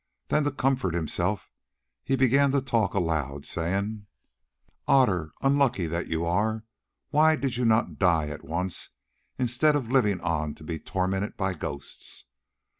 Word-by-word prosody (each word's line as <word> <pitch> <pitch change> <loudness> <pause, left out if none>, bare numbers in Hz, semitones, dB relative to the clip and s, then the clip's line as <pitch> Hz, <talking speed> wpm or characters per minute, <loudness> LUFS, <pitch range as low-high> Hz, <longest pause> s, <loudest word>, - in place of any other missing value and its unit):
Then 150 - +2
to 145 - +1
comfort 130 -10 0
himself 85 +4 -1 0.5
he 135 - +1
began 135 +2 +4
to 140 - +3
talk 115 -7 +1
aloud 75 -6 -1
saying: 100 +5 -2 0.8
"Otter, 90 - +3
unlucky 135 -9 +2
that 85 +2 -3
you 80 +1 -1
are, 110 +6 0 0.5
why 155 +1 +5
did 135 -5 -2
you 125 0 0
not 115 0 +2
die 85 -5 +3
at 75 - -7
once 85 +4 -2 0.5
instead 130 +5 +2
of 130 -5 -2
living 105 -8 +3
on 75 -3 -1
to - - -14
be 80 0 -4
tormented 95 +4 -2
by 95 -2 0
ghosts? 70 -4 -5
100 Hz, 145 wpm, -27 LUFS, 85-130 Hz, 0.8 s, why